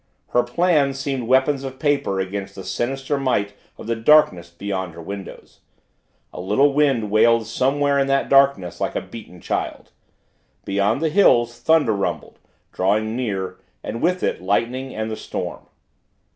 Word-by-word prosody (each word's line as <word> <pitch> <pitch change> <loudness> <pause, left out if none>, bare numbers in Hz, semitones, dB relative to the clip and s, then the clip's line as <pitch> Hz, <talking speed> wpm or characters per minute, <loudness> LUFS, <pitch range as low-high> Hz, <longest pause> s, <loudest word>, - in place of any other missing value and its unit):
Her 120 - +3
plans 140 +1 +1
seemed 135 -4 -3
weapons 130 +2 +2
of 130 -1 -6
paper 140 -10 0
against 95 +1 -4
the 95 - -8
sinister 135 +6 -2
might 105 -7 0 0.2
of - - -10
the 115 +1 -1
darkness 115 - +4
beyond 95 -1 -5
her 85 - -9
windows. 100 +2 -9 0.7
A - - -6
little 135 +10 +2
wind 135 -8 +1
wailed 115 +1 +4
somewhere 140 +3 +1
in 135 - +1
that 135 0 +1
darkness 135 -10 +3
like - - -2
a - - -1
beaten 105 -6 -11
child - - -4 0.7
beyond 100 +6 0
the 160 - +2
hills 120 - +3
thunder 160 -8 +3
rumbled, 100 -1 -4 0.3
drawing 110 +4 0
near, 95 -7 -3 0.2
and 115 - -5
with 180 +2 +1
it - - -1
lightning 120 +7 -1
and 110 0 -3
the - - -3
storm. - - -6
120 Hz, 155 wpm, -21 LUFS, 100-140 Hz, 0.7 s, darkness